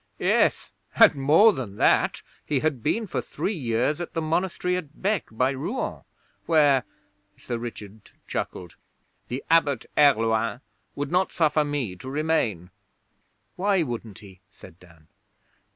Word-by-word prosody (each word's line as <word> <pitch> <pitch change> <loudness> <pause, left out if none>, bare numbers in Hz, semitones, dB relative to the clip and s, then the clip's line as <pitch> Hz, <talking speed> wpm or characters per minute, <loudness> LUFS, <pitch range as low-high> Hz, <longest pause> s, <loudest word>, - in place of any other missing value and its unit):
'Yes, - - +1 0.2
and - - +7
more 155 +11 +5
than 115 - -6
that. - - +2 0.2
He 140 -3 -1
had 150 -6 -1
been 225 - 0
for - - -3
three 210 - -3
years 130 - -1
at 175 - -6
the - - 0
monastery 180 +2 -1
at 160 -4 -7
Bec 200 -2 0
by 125 +4 +1
Rouen, 160 - -4 0.5
where' 145 -6 +4 0.5
Sir 120 -2 -5
Richard 110 -3 -9 0.2
chuckled 90 -2 -5 0.5
'the 125 +2 -5
Abbot 145 -7 +3
Herluin 115 -4 +3 0.3
would 145 0 -4
not 185 +2 +1
suffer 155 -2 +2
me 145 -10 -3
to 130 - -9
remain.' 135 - -1 0.9
'Why 195 -1 +2
wouldn't 115 -6 -6
he?' 95 -4 -15
said 90 -2 -16
Dan. 85 -3 -20
140 Hz, 135 wpm, -25 LUFS, 115-160 Hz, 0.9 s, and